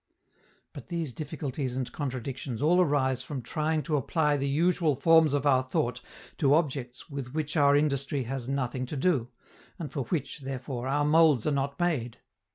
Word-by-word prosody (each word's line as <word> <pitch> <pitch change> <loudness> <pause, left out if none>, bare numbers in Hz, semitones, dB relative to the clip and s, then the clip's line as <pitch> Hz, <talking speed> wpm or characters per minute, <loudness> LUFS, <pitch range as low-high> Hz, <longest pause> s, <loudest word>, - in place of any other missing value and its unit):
But - - -10
these 165 -7 -3
difficulties 140 -4 -4
and 130 -2 -3
contradictions 130 -3 -4
all 175 +6 +4
arise 135 -6 +1
from 130 0 -6
trying 155 +4 -1
to 150 0 0
apply 150 +2 +1
the 140 -1 -1
usual 165 0 +2
forms 160 +1 +5
of 145 0 -1
our 130 -3 +4
thought 125 -1 -2 0.4
to 140 -2 +4
objects 135 -6 -2
with 140 -2 -6
which 155 0 -2
our 145 -2 +5
industry 140 -2 0
has 125 0 -4
nothing 130 -2 -2
to 145 - -5
do, 135 -5 +1 0.5
and 165 -5 -6
for 140 -5 -3
which, 150 +3 -3
therefore, 130 -2 -5
our 145 +2 +1
molds 150 -5 +4
are 150 - +2
not 140 0 -2
made. 145 -10 -1
140 Hz, 170 wpm, -28 LUFS, 130-155 Hz, 0.5 s, forms